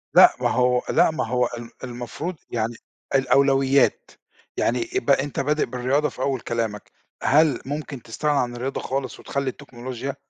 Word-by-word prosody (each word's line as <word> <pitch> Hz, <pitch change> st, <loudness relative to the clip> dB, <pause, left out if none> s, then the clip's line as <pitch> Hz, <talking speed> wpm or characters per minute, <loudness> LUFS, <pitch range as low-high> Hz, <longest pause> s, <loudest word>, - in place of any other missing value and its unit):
لأ، -, -, +8 dB
ما -, -, +2 dB
هو 125 Hz, 0 st, +2 dB
لأ -, -, +4 dB
ما 155 Hz, -7 st, -2 dB
هو 125 Hz, +1 st, +2 dB
ال 115 Hz, 0 st, -8 dB
المفروض 125 Hz, +8 st, -5 dB, 0.2 s
يعني 115 Hz, 0 st, -1 dB, 0.4 s
الأولويات، 135 Hz, -, +3 dB, 0.5 s
يعني 350 Hz, 0 st, 0 dB
يبقى 390 Hz, -, +2 dB
أنت 145 Hz, -, -4 dB
بادئ 150 Hz, +2 st, +1 dB
بالرياضة 135 Hz, +4 st, 0 dB
في 125 Hz, -, -9 dB
أول 135 Hz, -2 st, 0 dB
كلامك، 115 Hz, -3 st, -3 dB, 0.3 s
هل 150 Hz, -2 st, +4 dB
ممكن 145 Hz, -2 st, -5 dB
تستغنى 145 Hz, +6 st, -1 dB
عن 120 Hz, -1 st, -1 dB
الرياضة 130 Hz, +3 st, -3 dB
خالص 135 Hz, 0 st, -3 dB
وتخلّي 140 Hz, -1 st, -2 dB
التكنولوجيا؟ 130 Hz, 0 st, -6 dB
130 Hz, 150 wpm, -23 LUFS, 120-145 Hz, 0.5 s, لأ